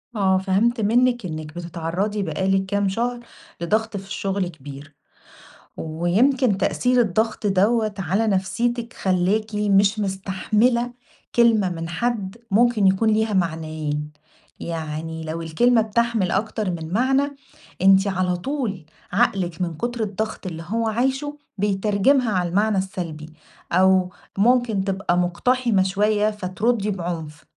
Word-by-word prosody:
آه، 190 -2 +3
فهمت 210 +5 +1
منِك 240 +1 +2
إنِك 155 -1 -6
بتتعرضي 175 +5 -3
بقى 190 0 -2
لِك 190 0 +2
كام 200 0 0
شهر 240 +4 -2 0.4
لضغط 215 +4 0
في 195 0 -9
الشغل 195 -1 -2
كبير، 145 -2 -11 0.8
ويمكن 195 - +1
تأثير 250 +5 +1
الضغط 220 +1 0
دَوّة 210 +3 +2
على 195 +5 0
نفسيتِك 230 +5 -1
خلّاكِ 200 +4 0
مش 205 +1 +3
مستحملة 210 +5 0 0.4
كلمة 225 -5 +4
من 165 -1 -5
حد 210 +2 -2
ممكن 225 -2 +4
يكون 195 +4 +3
ليها 220 0 +1
معنيين، 155 -4 -2 0.5
يعني 160 0 -5
لو 160 +1 -4
الكلمة 225 +9 +3
بتحمل 220 -3 0
أكتر 215 0 -1
من 165 0 -5
معنى 270 +4 +1 0.5
أنتِ 195 +1 +5
على 185 -2 0
طول 210 - -3 0.3
عقلِك 180 -3 0
من 170 -2 -1
كتر 240 +1 -2
الضغط 215 0 -4
اللي 165 -2 -6
هو 230 +1 -1
عايشه 270 +6 -1 0.2
بيترجمها 210 +5 +2
على 180 -2 0
المعنى 205 +2 +1
السلبي، 170 -5 -4 0.4
أو 185 0 +4 0.3
ممكن 230 -2 +3
تبقى 190 -2 0
مقتحمة 205 +4 +1
شويّة 210 +2 +1
فتردّي 210 +2 -1
بعنف، 170 -5 -5
195 Hz, 125 wpm, -22 LUFS, 180-225 Hz, 0.8 s, أنتِ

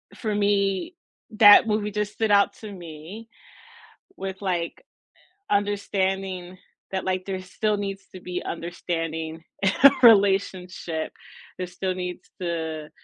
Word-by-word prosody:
for 215 -3 -3
me, 200 - +1 0.4
that 210 0 +9
movie 210 -1 0
just 210 0 -2
stood 220 -2 0
out 200 0 +4
to 215 -2 -7
me 175 +4 -10 0.9
with, 190 0 -5
like, 175 -4 -1 0.8
u 205 - +6
understanding 190 -2 -2 0.3
that, 190 -1 -2
like, 185 0 -1
there 190 -1 -4
still 210 +3 -1
needs 195 -1 -5
to 185 - -9
be 180 0 -4
understanding 165 -1 -4 0.2
in 190 - +4
our 280 0 +8
relationship. 190 -6 +3 0.5
There 185 - -4
still 185 +1 -3
needs 180 -1 -6
to 160 -3 -3
190 Hz, 130 wpm, -25 LUFS, 175-205 Hz, 0.9 s, that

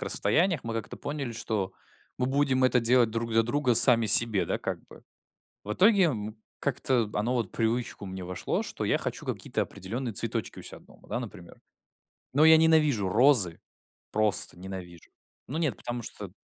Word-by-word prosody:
расстояниях, 160 - +1
мы 115 - -4
как-то 115 -1 -6
поняли, 140 -5 -5
что 105 -4 -3 0.4
мы 125 - -1
будем 135 -1 +1
это 125 -1 +3
делать 120 -1 +3
друг 115 +1 -3
для 115 0 +4
друга 125 +1 0
сами 115 -2 +6
себе, 110 -1 +7
да, - - -1
как - - -4
бы. - - -15 0.6
В 105 +1 -4
итоге, 200 - +4
м, 110 -8 -2 0.2
как-то 125 -5 -1
оно 115 +4 -1
вот 120 -3 -1
в - - -30
привычку 115 -2 -2
мне 95 -1 -7
вошло, 90 0 -3
что - - -5
я - - +1
хочу - - -5
какие-то - - -3
определённые 115 +5 -6
цветочки - - -3
у - - -9
себя - - -7
дома, - - -21
да, 120 - -3
например. 100 -7 -10 0.7
Но 150 +4 +4
я 160 0 +8
ненавижу 155 -10 +3
розы. 110 - +3 0.5
Просто 105 -4 -1
ненавижу. 90 -3 -10 0.4
Ну 150 +5 -5
нет, 150 -10 -1
потому 120 0 -6
что 100 -3 -8
115 Hz, 175 wpm, -27 LUFS, 105-135 Hz, 0.7 s, я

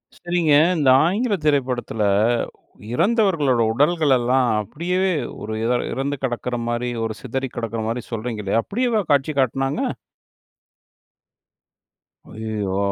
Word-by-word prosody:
சரிங்க. 175 -3 0 0.2
இந்த 140 -4 +3 0.2
ஆங்கில 205 +4 +1
திரைப்படத்துல, 125 -6 0 0.9
இறந்தவர்களோட 170 - +2
உடல்களெல்லாம் 135 -4 +2
அப்படியேவே 180 - -1 0.3
ஒரு 110 - -5
இதழ் 120 +1 +1
இறந்து 140 +2 -2
கிடக்குற 120 -1 -2
மாரி, 120 +1 -1 0.2
ஒரு 110 - -3
சிதறி 130 +1 -3
கிடக்குற 115 -1 -3
மாரி 120 +1 -3
சொல்றீங்க 110 -1 -4
இல்லையா? 110 +4 +1
அப்படியேவா 235 0 0
காட்சி 140 +2 +2
காட்டுனாங்க? 135 +2 0 2.5
ஐயயோ! 105 -3 -3
130 Hz, 100 wpm, -22 LUFS, 120-165 Hz, 2.5 s, இந்த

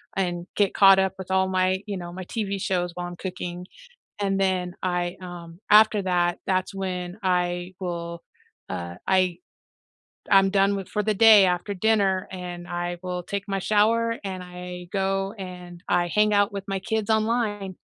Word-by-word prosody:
and 175 -2 -1
get 205 -2 +2
caught 195 -1 +7
up 190 -1 +1
with 190 0 -7
all 190 0 +3
my 185 0 +1
you 200 - -3
know, 175 -1 -7
my 185 0 -6
TV 200 -1 -3
shows 180 -2 -1
while 175 0 -5
I'm 175 - -8
cooking, 180 -1 -6 0.5
and 195 -1 0
then 185 -2 0
I, 175 -1 -1
um 175 -1 -9
after 215 -1 +6
that, 175 -1 +1
that's 185 0 0
when 180 -1 -4
I 180 0 0
will, 170 -2 -5 0.5
uh, 85 -1 -5
I 185 -2 +2 0.9
I'm 195 -1 +6
done 195 0 +3
with 195 - -6
for 210 -1 -2
the 215 - +1
day 210 -1 +8
after 180 +3 -1
dinner, 195 -2 +2
and 175 -1 -7
I 175 0 -3
will 180 -1 -4
take 200 +3 -4
my 195 -1 -1
shower, 230 +3 +2
and 185 -2 -4
I 180 0 -8
go 195 0 0
and 180 -2 -8
I 175 0 +2
hang 210 +2 +3
out 205 0 +3
with 200 -1 -5
my 195 -1 -2
kids 220 +2 -2
online. 215 -4 0
185 Hz, 175 wpm, -25 LUFS, 175-200 Hz, 0.9 s, day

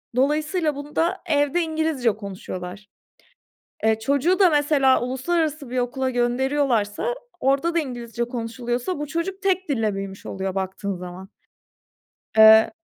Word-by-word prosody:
dolayısıyla, 300 +4 +1
bunda, 320 +6 -1
evde 290 +1 +2
İngilizce 315 -7 0
konuşuyorlar. 195 -1 -7 1.0
Eee, 220 0 +3
çocuğu 280 - +1
da 375 -3 +7
mesela 290 -3 +3
uluslararası 290 +3 -1
bir 255 - -3
okula 255 +2 -1
gönderiyorlarsa, 250 - 0 0.2
orada 280 +5 +1
da - - +4
İngilizce 240 -5 -4
konuşuluyorsa 240 +6 -3
bu 295 - -3
çocuk 370 +5 -3
tek 380 -3 0
dille 225 -7 0
büyümüş 195 0 -7
oluyor 190 0 -4
baktığın 195 +1 -3
zaman. 180 +1 -9 1.1
Eee 220 +3 +8
260 Hz, 120 wpm, -23 LUFS, 220-310 Hz, 1.1 s, Eee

